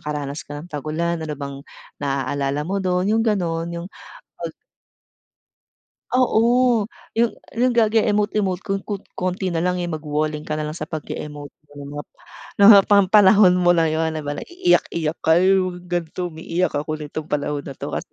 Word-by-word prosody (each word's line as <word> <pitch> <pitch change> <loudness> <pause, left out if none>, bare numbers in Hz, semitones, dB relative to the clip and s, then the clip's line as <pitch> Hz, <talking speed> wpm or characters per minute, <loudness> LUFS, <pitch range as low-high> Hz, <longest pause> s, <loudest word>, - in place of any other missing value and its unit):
nakaranas 145 -1 -4
ka 145 - -6
ng 165 +4 -10
tagulan. 160 +3 -2
Ano 155 -2 -4
bang 140 -1 -6 0.4
naaalala 140 +1 -1
mo 195 +3 -2
dun? 180 -1 0
Yung 225 - +3
ganon 170 -7 -1
yung 170 0 -5 0.5
pag - - -5 1.6
Oo, 245 -1 +3 0.3
yung 230 0 +3 0.2
yung 250 +2 +2
gage 225 -1 +3
emote-emote 205 -3 0
kon 195 0 -2
kon 205 -2 -4 0.2
konti 185 +1 -2
na 165 -1 -1
lang, 180 0 0
eh, 175 - -2
magwo-walling 150 -1 -2
ka 155 - -3
na 150 - -2
lang 155 - -7
sa - - -4
pag-e-emot-emote,' 145 -2 -8 0.5
no, 200 - +8
ho 210 - +11
pan 200 -2 +4
panahon 200 -2 +6
mo 175 -1 +4
na 165 -1 +3
yun, 160 +1 0
'di 155 - -4
ba, 145 0 -3
na - - -5
iiyak-iyak 345 - 0
ka 160 +1 +5
yung 185 -1 +2
mga - - -16 0.2
ganto 175 +3 -5
umiiyak 170 +2 -2
ako 145 +2 -2
nitong 150 +1 -6
panahon 145 0 -1
na 140 - -6
to - - -6
kasi - - -5
170 Hz, 170 wpm, -21 LUFS, 150-195 Hz, 1.6 s, ho